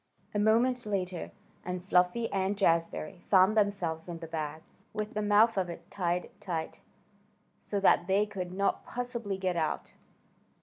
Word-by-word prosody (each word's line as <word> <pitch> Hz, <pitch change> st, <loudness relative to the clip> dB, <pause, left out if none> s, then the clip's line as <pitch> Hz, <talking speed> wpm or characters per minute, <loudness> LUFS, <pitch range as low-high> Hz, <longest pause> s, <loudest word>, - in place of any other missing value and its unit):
A 205 Hz, -, 0 dB
moment 240 Hz, +4 st, +3 dB
later 185 Hz, -3 st, -2 dB, 0.3 s
and 180 Hz, 0 st, -4 dB
Fluffy 180 Hz, +5 st, +3 dB
and 195 Hz, +1 st, 0 dB
Jazbury 165 Hz, -2 st, 0 dB
found 190 Hz, +2 st, +6 dB
themselves 185 Hz, -6 st, 0 dB
in 170 Hz, -, -4 dB
the 165 Hz, -, -7 dB
bag, 155 Hz, -1 st, -4 dB, 0.3 s
with 215 Hz, 0 st, -3 dB
the 215 Hz, -, -1 dB
mouth 210 Hz, +1 st, +4 dB
of 180 Hz, -2 st, -1 dB
it 170 Hz, +2 st, -9 dB
tied 180 Hz, -2 st, -1 dB
tight, 165 Hz, -4 st, -4 dB, 0.8 s
so 205 Hz, -, -3 dB
that 180 Hz, -3 st, +4 dB
they 195 Hz, +2 st, +3 dB
could 190 Hz, -4 st, -5 dB
not 200 Hz, +2 st, 0 dB
possibly 235 Hz, -5 st, -4 dB
get 185 Hz, -2 st, -1 dB
out. 160 Hz, -2 st, -2 dB
190 Hz, 150 wpm, -30 LUFS, 175-210 Hz, 0.8 s, found